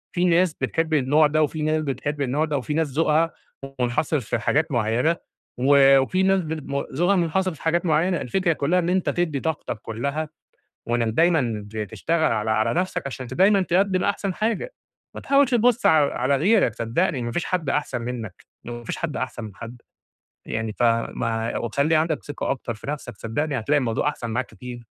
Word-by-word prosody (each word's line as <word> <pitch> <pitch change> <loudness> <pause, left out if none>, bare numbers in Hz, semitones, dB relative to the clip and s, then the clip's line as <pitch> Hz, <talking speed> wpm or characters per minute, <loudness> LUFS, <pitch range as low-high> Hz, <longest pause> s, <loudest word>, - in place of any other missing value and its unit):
في 175 0 +2
ناس 175 -1 +3
بتحب 165 0 -2
النوع 150 +2 +4
ده 155 +1 +2
وفي 155 +1 -2
ناس 155 +1 +1
بتحب 145 +1 -3
النوع 140 +4 +1
ده 145 -4 -2
في 150 - -4
ناس 160 0 +1
ذوقها 155 +3 +2 0.5
منحصر 125 +5 0
في 115 -1 -3
حاجات 145 +8 +1
معيّنة، 120 +7 +1 0.4
و 135 +1 +6
وفي 185 +8 +1
ناس 195 0 +3
ب 155 -4 -5 0.2
ذوقها 175 +7 +2
منحصر 185 +1 0
في 155 - -15
حاجات 170 +2 +1
معيّنة. 175 +2 +2
الفكرة 170 +7 0
كلّها 160 +5 +1
إن 175 -1 -1
أنت 185 0 +1
تدّي 160 -5 -1
طاقتك 150 -7 -3
كلّها، 140 +7 -3 0.6
وإنك 120 -1 +1
دايمًا 125 -9 +1 0.2
تشتغل 160 - 0
على 110 -1 0
على 110 0 +1
نفسك 180 -3 -1
عشان 130 -1 -6
دايمًا 195 - +3
تقدم 185 +1 +1
أحسن 200 -1 -1
حاجة، 225 - -2 0.4
ما - - -6
تحاولش 275 -1 +3
تبُص 240 0 +3
علي 155 -3 +4
على 130 +3 +1
غيرك 190 - +3
صدقني 120 +12 0
لان 130 -5 -4
ما 120 - -3
فيش 175 - -2
حد 170 -6 -1
أحسن 145 -4 -1
منك، 115 -6 -6 0.2
وما 120 0 -6
فيش - - -4
حد 165 -3 -3
أحسن 125 -2 -4
من 105 -2 -9
حد، 115 +2 -10 0.7
يعني 110 -1 -3
ف 115 - -4 0.3
ما 115 -1 -2
وخلّي 140 +7 +1
عندك 155 0 0
ثقة 145 - -4
أكتر 120 -3 -3
في 110 - -12
نفسك 140 -6 -6
صدقني 140 +5 -2
هتلاقي 145 +6 +2
الموضوع 125 +1 0
أحسن 120 -6 -4
معاك 120 +2 -1
كتير. 125 -2 -10
150 Hz, 185 wpm, -23 LUFS, 120-170 Hz, 0.7 s, و